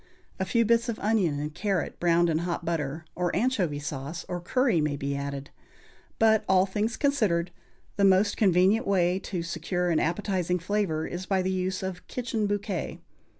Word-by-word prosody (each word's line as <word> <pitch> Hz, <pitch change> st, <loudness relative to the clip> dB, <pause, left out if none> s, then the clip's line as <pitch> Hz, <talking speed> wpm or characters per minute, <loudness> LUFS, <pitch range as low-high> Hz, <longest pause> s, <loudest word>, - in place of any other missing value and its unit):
A 190 Hz, -, 0 dB
few 230 Hz, +5 st, +2 dB
bits 230 Hz, +2 st, +2 dB
of 225 Hz, -, -2 dB
onion 195 Hz, -9 st, +1 dB
and 150 Hz, +1 st, -4 dB
carrot 195 Hz, +1 st, -2 dB
browned 175 Hz, 0 st, +3 dB
in 155 Hz, -, +1 dB
hot 170 Hz, 0 st, -3 dB
butter, 160 Hz, -1 st, -2 dB
or 180 Hz, 0 st, -1 dB
anchovy 200 Hz, -, +1 dB
sauce 145 Hz, +2 st, -5 dB
or 175 Hz, -1 st, -4 dB
curry 235 Hz, -, +2 dB
may 150 Hz, -1 st, 0 dB
be 140 Hz, 0 st, -2 dB
added; 140 Hz, 0 st, -5 dB, 0.7 s
but, 220 Hz, -1 st, +4 dB
all 190 Hz, 0 st, +5 dB
things 210 Hz, +4 st, -2 dB
considered, 205 Hz, -, +1 dB, 0.5 s
the 200 Hz, -, +2 dB
most 195 Hz, +1 st, +4 dB
convenient 195 Hz, +4 st, +3 dB
way 185 Hz, -2 st, +2 dB
to 180 Hz, -3 st, -4 dB
secure 175 Hz, +1 st, -2 dB
an 160 Hz, -, +3 dB
appetizing 180 Hz, 0 st, 0 dB
flavor 180 Hz, -3 st, -1 dB
is 180 Hz, +2 st, -5 dB
by 190 Hz, -2 st, +1 dB
the 190 Hz, -, 0 dB
use 185 Hz, 0 st, -2 dB
of 185 Hz, -1 st, -5 dB
"Kitchen 230 Hz, -4 st, -2 dB
Bouquet." 200 Hz, -3 st, -3 dB
185 Hz, 175 wpm, -27 LUFS, 170-205 Hz, 0.7 s, all